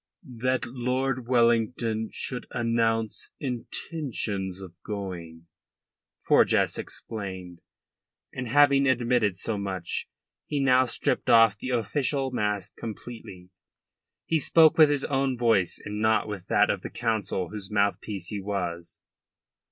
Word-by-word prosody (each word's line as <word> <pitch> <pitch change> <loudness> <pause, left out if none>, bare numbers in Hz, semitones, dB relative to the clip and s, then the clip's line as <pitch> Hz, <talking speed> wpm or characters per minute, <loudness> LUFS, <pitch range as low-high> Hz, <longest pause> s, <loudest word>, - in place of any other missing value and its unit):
"That 130 +1 +1
Lord 125 +1 -2
Wellington 115 -2 +1
should 125 -2 -4
announce 115 -2 0
intentions 115 - -3
of 95 -3 -10
going," 90 -5 -6 0.8
Forjas - - +3
explained. 95 -5 -6 0.7
And 125 -1 -4
having 140 +2 +5
admitted 120 -6 +2
so 105 +1 -2
much, 95 -3 -3 0.4
he 145 - -1
now 130 -1 +4
stripped 120 - -1
off 115 -3 +6
the 130 - -5
official 130 +3 -1
mask 105 -4 -2
completely. 105 -5 -9 0.7
He 160 - +1
spoke 160 +2 +5
with 155 -2 +7
his 145 -1 +1
own 135 -2 0
voice 115 -7 +2
and 105 +1 -4
not 110 0 +2
with 100 -4 -6
that - - +3
of - - -3
the - - -6
Council 110 -6 -2
whose 105 -3 -7
mouthpiece 100 -2 -1
he 105 -2 -4
was. 90 -4 -4
115 Hz, 120 wpm, -26 LUFS, 100-125 Hz, 0.8 s, with